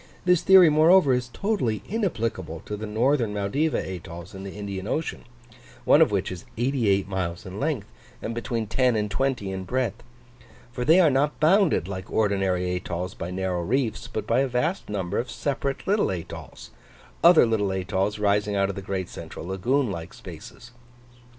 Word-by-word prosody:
This 180 -2 +4
theory, 185 -4 +7
moreover, 155 -1 +5
is 125 -1 -1
totally 160 - -1
inapplicable 115 - -2
to 105 - -4
the 110 +1 -6
northern 115 0 +1
Maldiva 135 +11 0
atolls 85 +1 -7
in 95 - -8
the 100 - -8
Indian 100 -1 -5
Ocean 155 +7 -3 0.6
(one 145 - +6
of 160 - +6
which 100 -2 -1
is 90 -2 -7
88 115 -6 +1
miles 90 -3 -3
in 95 +2 -7
length, 140 -8 -1 0.3
and 115 - -4
between 115 -1 -2
10 125 +3 +2
and 105 -1 -1
20 130 -6 -1
in 95 0 -4
breadth), 120 +2 -2 0.7
for 125 0 -3
they 160 +8 +6
are 165 -5 +5
not 140 +3 +1
bounded 165 - +3
like 95 0 -6
ordinary 95 -4 +1
atolls 90 0 -4
by 85 - -6
narrow 90 -1 -2
reefs, 115 +3 -1
but 110 - -4
by 115 +3 +2
a 135 - +2
vast 150 +9 -1
number 100 -2 -2
of 125 - -3
separate 140 -1 -3
little 205 +2 +2
atolls; 90 -3 -7 0.5
other 170 -5 +8
little 110 -3 0
atolls 95 +2 -1
rising 105 0 +1
out 100 0 +2
of 100 - -4
the 100 - -5
great 95 -1 -3
central - - -9
lagoon 115 +7 0
like 85 -1 -7
spaces. 120 - -11
110 Hz, 175 wpm, -25 LUFS, 95-135 Hz, 0.7 s, other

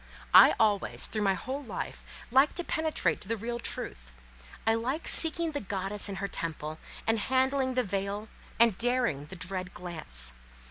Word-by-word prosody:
I - - +9
always, 210 -3 +1
through 215 - -3
my 195 -2 +3
whole 265 +8 -4
life, 245 - -6 0.3
liked 270 +4 +5
to 350 - -1
penetrate 315 -2 0
to - - -7
the 230 +1 -1
real 235 +3 -4
truth; - - -4 0.5
I 225 - +4
like 255 +8 -2
seeking 330 0 +3
the 290 - -3
goddess 200 0 +1
in 195 - -4
her 200 +1 -3
temple, 155 -3 -5 0.3
and 225 0 +2
handling 260 +2 +1
the 255 - +2
veil, 200 +2 -3 0.3
and 230 -3 +6
daring 240 - +1
the 190 - -10
dread 180 +1 -5
glance. 60 - -5
215 Hz, 170 wpm, -29 LUFS, 185-255 Hz, 0.5 s, I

